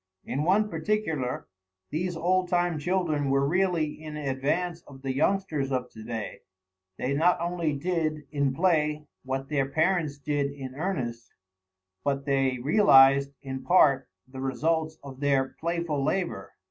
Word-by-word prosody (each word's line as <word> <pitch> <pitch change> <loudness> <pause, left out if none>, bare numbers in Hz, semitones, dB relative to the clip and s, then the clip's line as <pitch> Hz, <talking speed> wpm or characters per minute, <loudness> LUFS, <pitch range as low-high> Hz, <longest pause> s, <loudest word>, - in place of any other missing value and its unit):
In 140 - -2
one 195 +7 +3
particular 165 -13 -2 0.4
these 175 +3 -2
old 180 +2 +1
time 175 -2 +1
children 155 -4 0
were 135 +1 +2
really 175 -1 +2 0.2
in 155 -1 -7
advance 150 +5 -1
of 135 -1 -13
the 135 -1 -1
youngsters 155 -2 0
of 125 -1 -2
to 110 - -11
day; 110 -2 -5 0.6
they 130 +2 -1
not 165 +5 +3
only 170 -2 -1
did, 155 0 -1
in 140 -3 +1
play, 150 -1 +1 0.2
what 135 +1 -3
their 135 -3 0
parents 160 -1 +1
did 145 0 -1
in 135 -2 -7
earnest, 130 -8 -4 0.7
but 140 -1 -1
they 135 -2 +1
realized, 140 - +5
in 130 -1 -5
part, 135 - +4 0.2
the 130 0 -8
results 155 +4 0
of 135 -2 -10
their 140 -2 +2
playful 170 -4 -1
labor. 180 +4 -1
150 Hz, 145 wpm, -27 LUFS, 135-170 Hz, 0.7 s, realized